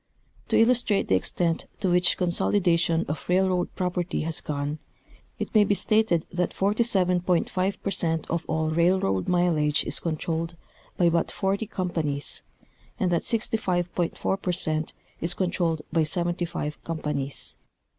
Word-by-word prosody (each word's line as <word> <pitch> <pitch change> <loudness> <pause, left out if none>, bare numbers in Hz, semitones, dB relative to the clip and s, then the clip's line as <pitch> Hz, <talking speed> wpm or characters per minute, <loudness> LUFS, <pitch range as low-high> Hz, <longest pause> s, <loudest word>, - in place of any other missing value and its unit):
To - - 0
illustrate 230 -3 +3
the 95 - +5
extent 165 - 0
to 185 - +1
which 180 0 +4
consolidation 170 -2 +2
of 150 - -4
railroad 185 0 +2
proj) 180 -2 -1
erty 175 -3 -2
has 160 0 0
gone, 145 +1 -3 0.6
it - - -5
may 215 -2 +6
be 205 0 +2
stated 215 -6 +2
that 180 0 -1
47.5 190 -3 +1
per 200 - -1
cent 165 -4 0
of 170 -1 -1
all 160 0 0
railroad 170 - +2
mileage 165 -4 +2
is - - 0
controlled 165 +1 -2 0.4
by 175 - +4
but 170 0 +1
forty 200 +2 -1
companies,, 165 -8 -3 0.6
and 180 - +1
that 170 - +2
65.4 190 -4 -1
per 180 - 0
cent 155 -2 -2 0.3
is 170 +1 +2
controlled 175 -4 0
by 165 -2 +3
seventy 175 +2 -1
five 155 -3 -5
companies. 150 -4 -3
175 Hz, 140 wpm, -26 LUFS, 160-185 Hz, 0.6 s, may